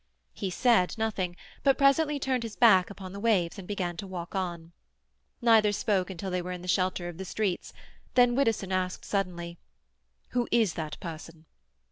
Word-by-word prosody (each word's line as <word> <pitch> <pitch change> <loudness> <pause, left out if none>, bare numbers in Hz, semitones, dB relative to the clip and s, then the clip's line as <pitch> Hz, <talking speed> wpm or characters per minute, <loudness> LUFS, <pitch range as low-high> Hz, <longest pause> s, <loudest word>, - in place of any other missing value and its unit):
He 195 - -3
said 225 -1 +2
nothing, 200 -5 -1 0.3
but 275 -1 +3
presently 290 +2 +3
turned 265 -2 0
his 230 -2 -6
back 190 -6 +5
upon 195 -2 -9
the 200 - -6
waves 200 -4 +1
and 185 - -9
began 180 -4 -3
to 195 - -6
walk 180 -2 -6
on. 175 -3 -3 0.7
Neither 220 -3 +5
spoke 200 -3 0
until 190 +1 -5
they 180 0 0
were 180 +1 -5
in 180 -1 -6
the - - -8
shelter 185 -1 0
of 175 0 -8
the - - -3
streets; 190 -1 -2 0.4
then 245 -1 +5
Widdowson 225 -7 +1
asked 185 -1 -1
suddenly,— 175 -4 -3 0.7
"Who 245 -1 0
is 225 -7 +3
that 155 -2 -5
person?" 165 -2 -8
190 Hz, 175 wpm, -28 LUFS, 180-225 Hz, 0.7 s, back